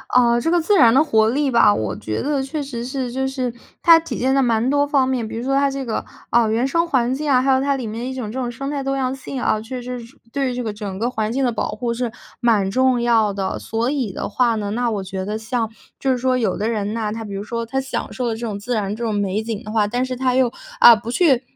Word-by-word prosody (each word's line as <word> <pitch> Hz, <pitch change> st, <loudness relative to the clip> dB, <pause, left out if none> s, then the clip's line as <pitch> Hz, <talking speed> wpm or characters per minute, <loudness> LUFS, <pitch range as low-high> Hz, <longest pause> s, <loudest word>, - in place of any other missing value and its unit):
呃， 240 Hz, -1 st, +4 dB
这 325 Hz, -, 0 dB
个 350 Hz, +1 st, +3 dB
自 370 Hz, +6 st, +2 dB
然 245 Hz, -11 st, +7 dB
的 270 Hz, +6 st, +5 dB
活 220 Hz, -7 st, +3 dB
力 275 Hz, +3 st, +1 dB
吧， 235 Hz, -3 st, +6 dB
我 110 Hz, -, -2 dB
觉 110 Hz, -, -3 dB
得 285 Hz, 0 st, 0 dB
确 290 Hz, +3 st, -4 dB
实 245 Hz, -4 st, -5 dB
是 255 Hz, 0 st, -3 dB
就 265 Hz, +2 st, -1 dB
是 260 Hz, -3 st, -3 dB, 0.3 s
它 330 Hz, -1 st, +8 dB
体 330 Hz, -, -5 dB
现 260 Hz, +2 st, +1 dB
在 275 Hz, -, +3 dB
蛮 235 Hz, -2 st, +2 dB
多 285 Hz, +1 st, +3 dB
方 275 Hz, -3 st, +2 dB
面， 250 Hz, -4 st, -1 dB
比 225 Hz, -, -6 dB
如 235 Hz, -, -4 dB
说 270 Hz, +2 st, 0 dB
它 280 Hz, 0 st, +3 dB
这 270 Hz, -1 st, -4 dB
个， 225 Hz, -, -2 dB, 0.3 s
啊， 235 Hz, -1 st, +4 dB
原 230 Hz, +4 st, +1 dB
生 335 Hz, +5 st, +1 dB
环 255 Hz, -4 st, +1 dB
境 295 Hz, +2 st, -2 dB
啊， 260 Hz, -2 st, +5 dB
还 265 Hz, +1 st, +2 dB
有 260 Hz, 0 st, +3 dB
它 280 Hz, 0 st, +1 dB
里 255 Hz, -, -4 dB
面 230 Hz, +4 st, -4 dB
一 260 Hz, -, -5 dB
种 230 Hz, -5 st, -4 dB
这 260 Hz, -, -4 dB
种 245 Hz, -2 st, -2 dB
生 275 Hz, +4 st, -5 dB
态 280 Hz, -2 st, -3 dB
多 275 Hz, 0 st, -1 dB
样 260 Hz, -1 st, 0 dB
性 265 Hz, 0 st, -6 dB
啊， 215 Hz, -3 st, +1 dB
确 250 Hz, +3 st, -6 dB
实 250 Hz, 0 st, -5 dB
是 235 Hz, +4 st, -13 dB, 0.2 s
对 275 Hz, -2 st, 0 dB
于 250 Hz, -, -4 dB
这 250 Hz, -, -3 dB
个 220 Hz, -2 st, -3 dB
整 205 Hz, -2 st, -6 dB
个 225 Hz, +4 st, 0 dB
环 220 Hz, -3 st, -2 dB
境 265 Hz, +2 st, 0 dB
的 245 Hz, -, +1 dB
保 230 Hz, -, -2 dB
护 235 Hz, +2 st, -2 dB
是 240 Hz, 0 st, -2 dB, 0.3 s
蛮 210 Hz, -5 st, +2 dB
重 260 Hz, +2 st, +3 dB
要 230 Hz, -3 st, +3 dB
的。 195 Hz, -1 st, -3 dB
所 230 Hz, +3 st, -1 dB
以 260 Hz, -8 st, -1 dB
的 -, -, -4 dB
话 235 Hz, +1 st, +2 dB
呢， 205 Hz, -2 st, -3 dB
那 240 Hz, +2 st, 0 dB
我 205 Hz, -3 st, -2 dB
觉 190 Hz, 0 st, -5 dB
得 210 Hz, +3 st, -3 dB
像， 225 Hz, 0 st, -2 dB, 0.3 s
就 270 Hz, -, +1 dB
是 255 Hz, -, +1 dB
说 255 Hz, +1 st, +1 dB
有 245 Hz, -3 st, 0 dB
的 215 Hz, -, -1 dB
人 215 Hz, -2 st, -2 dB
呐， 220 Hz, -2 st, -2 dB
他 225 Hz, +1 st, -5 dB
比 205 Hz, -2 st, -7 dB
如 195 Hz, +1 st, -4 dB
说 230 Hz, +2 st, -3 dB
他 265 Hz, +4 st, -1 dB
享 270 Hz, 0 st, -4 dB
受 250 Hz, -2 st, -3 dB
的 225 Hz, -, -1 dB
这 -, -, -9 dB
种 225 Hz, -4 st, -3 dB
自 245 Hz, +5 st, -3 dB
然 205 Hz, -2 st, -1 dB
这 235 Hz, -, -6 dB
种 220 Hz, -, -1 dB
美 205 Hz, +1 st, -1 dB
景 225 Hz, 0 st, -4 dB
的 215 Hz, -, -7 dB
话， 215 Hz, -1 st, +2 dB
但 245 Hz, +5 st, -1 dB
是 255 Hz, 0 st, -3 dB
他 255 Hz, 0 st, +1 dB
又， 255 Hz, -2 st, +3 dB, 0.3 s
啊， 235 Hz, -, +10 dB
不 220 Hz, +2 st, -6 dB
去 265 Hz, -3 st, +3 dB
240 Hz, 315 characters per minute, -21 LUFS, 220-265 Hz, 0.3 s, 啊